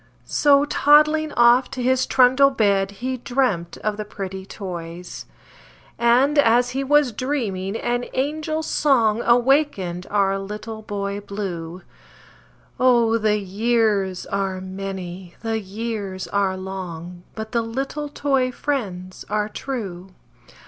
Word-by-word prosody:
So, 285 -1 +4
toddling 305 +1 +4
off 240 +2 +5
to 255 -2 -5
his 260 +1 +2
trundle 260 +2 +5
bed, 200 -7 +2
He 250 +6 -4
dremt 240 -10 -1
of 215 -1 -1
the 215 - -3
pretty 195 -2 -7
toys; 175 -3 -7 0.7
And, 255 +5 +4
as 245 -1 +4
he 270 +2 -2
was 290 -1 +3
dreaming, 220 -6 -2
an 245 +1 -1
angel 310 +3 -1
song 235 -8 +2
Awakened 240 - +2
our 195 -1 +1
Little 210 +3 -7
Boy 200 -1 -4
Blue 185 -4 -6 1.0
Oh! 235 -3 +4
the 210 -1 +2
years 205 -2 0
are 195 -1 -2
many, 185 -2 -7
the 225 -1 -1
years 205 -2 -5
are 195 -2 0
long, 180 -2 -7
But 220 0 -6
the 235 - +1
little 270 +6 -4
toy 270 -3 0
friends 195 -10 -4
are 210 0 0
true! 195 -8 -5
220 Hz, 120 wpm, -22 LUFS, 195-255 Hz, 1.0 s, off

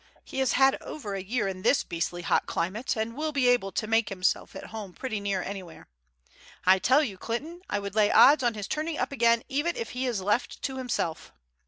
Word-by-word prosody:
He - - -6
has 265 -3 +2
had 270 0 +4
over 220 -10 -6
a 195 - -3
year 210 +2 -1
in 185 -1 -5
this 275 - +3
beastly 175 +1 -3
hot - - +1
climate, 210 +11 -2
and 220 +1 -3
will 310 +2 -2
be 275 -4 +2
able 245 -6 +3
to - - -1
make 225 0 +2
himself 185 -1 -1
at - - -7
home 205 -4 -7
pretty 230 -2 -4
near 200 -2 -1
anywhere. 185 -4 -8 0.8
I 190 +1 +6
tell 265 +10 +4
you, 195 -9 -5
Clinton, 310 +10 -4
I - - 0
would 200 -1 -5
lay 210 -1 +4
odds 290 +1 +7
on 240 -3 +1
his 205 -2 -5
turning 310 +1 -2
up - - -1
again 235 -3 +3
even 295 +6 -1
if 465 -1 -5
he 255 +1 -2
is 235 -5 -1
left 210 +6 -1
to 265 -1 -3
himself. 170 -11 -3
225 Hz, 220 wpm, -27 LUFS, 195-265 Hz, 0.8 s, odds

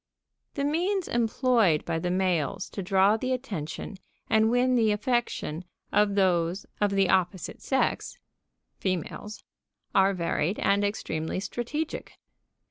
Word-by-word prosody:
The 280 - -1
means 350 +6 0
employed 230 - +2
by 165 -1 -1
the 180 - -2
males 180 -5 0
to 200 - -4
draw 195 +3 +3
the 255 +3 -1
attention 200 - -5 0.3
and 220 0 +4
win 250 +2 +3
the 225 -3 +3
affection 210 - -1 0.3
of 205 -1 +3
those 180 -1 +1 0.2
of 205 - +4
the 195 -1 +2
opposite 185 -1 0
sex 265 -1 0 0.6
(females) 190 +3 -4 0.5
are 195 0 +4
varied 170 +1 -1
and 200 +1 +2
extremely 185 -5 -2
strategic. 240 +10 -4
200 Hz, 125 wpm, -27 LUFS, 185-240 Hz, 0.6 s, and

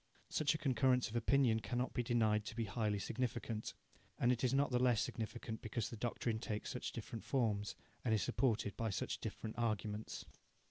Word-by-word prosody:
Such 155 0 +2
a - - 0
concurrence 130 -4 +3
of - - -7
opinion 120 -1 +4
cannot 125 +3 -1
be 125 - +1
denied 110 -3 +3
to - - -5
be 115 - 0
highly 105 0 0
significant 115 0 -2 0.4
and 120 - +4
is 125 - +4
not 140 0 +3
the 125 0 +3
less 125 -4 +4
significant 110 0 -4
because 110 0 -2
the - - -4
doctrine 115 0 -1
takes 105 -2 -3
such - - -3
different 115 - -6
forms, 110 -6 0 0.3
and 120 - +1
is 110 -2 +3
supported 110 -6 +1
by 115 -1 -1
such 95 - -2
different 110 +1 -5
arguments. 110 -2 -2
115 Hz, 180 wpm, -38 LUFS, 110-125 Hz, 0.4 s, opinion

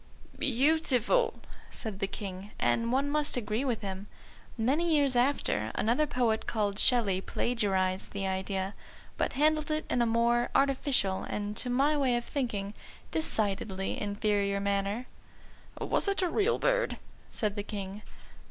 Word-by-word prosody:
_" - - -19
"Beautiful," 290 - +3 0.3
said 215 -5 -7
the 195 - 0
King, 195 -1 -7
and 230 0 +1
one 270 +3 +1
must 295 -2 0
agree 220 +1 -1
with 245 -5 -1
him. 195 0 -5 0.5
Many 305 +9 +2
years 280 -3 +3
after, 240 - +1
another 245 +8 +2
poet 235 -5 0
called 205 -3 -1
Shelley 205 -7 +4
plagiarised 190 -5 0
the 200 -1 -3
idea, 190 +1 -2 0.4
but - - -1
handled 305 +2 +2
it 310 0 -1
in 245 - +2
a 235 - +3
more 235 +1 +2
artificial, 265 -8 +2
and, 205 0 -3
to 250 - -2
my 275 +5 +3
way 265 -4 +2
of 240 0 -2
thinking, 210 -8 -3 0.4
decidedly 200 -9 -1
inferior 205 -1 0
manner. 200 +4 -1 0.7
"Was - - 0
it 395 -1 +1
a 360 - +1
real 425 +6 +2
bird?" - - +1 0.3
said 210 -2 -1
the 205 - -2
King. 200 -1 -6
230 Hz, 145 wpm, -30 LUFS, 200-275 Hz, 0.7 s, Shelley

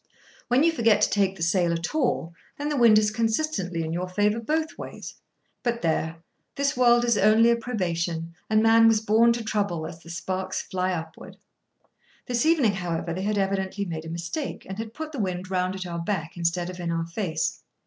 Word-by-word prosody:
When 250 +4 +3
you 335 - +4
forget 230 -8 +3
to - - +4
take 195 -2 +1
the 165 - -4
sail 170 0 +2
at 170 - -3
all, 240 - 0 0.2
then 290 +1 -2
the 300 - -1
wind 235 -5 +6
is 210 0 +3
consistently 220 - -1
in 160 0 -3
your 180 +2 -3
favour 210 +4 +1
both 310 +7 -1
ways. - - -8 0.5
But 235 -3 -2
there! 160 0 -1 0.3
this 280 0 0
world 240 -1 +4
is 235 -3 +2
only 220 +3 +5
a - - +4
probation, 170 -8 -2 0.2
and 215 0 +3
man 225 0 +6
was 225 -1 +4
born 220 +2 +4
to 235 -1 -4
trouble 200 -7 -1
as 170 0 -8
the 170 - -14
sparks 185 +2 -3
fly 185 0 -2
upward. 160 -2 -7 0.9
This 245 +3 0
evening, 285 -11 +4
however, 170 -3 -3
they 185 - -4
had 210 +1 -1
evidently 195 0 -1
made 165 -3 -5
a - - -6
mistake, 170 - -5
and 190 +2 -6
had 225 0 -6
put 315 0 -5
the 285 - -6
wind 185 -2 -3
round 185 0 0
at 190 -1 -5
our 170 -1 -4
back 170 -2 -3
instead 175 +1 -1
of 180 - -10
in 170 -1 -2
our 165 0 -1
face. 170 -1 -2
195 Hz, 205 wpm, -25 LUFS, 170-230 Hz, 0.9 s, wind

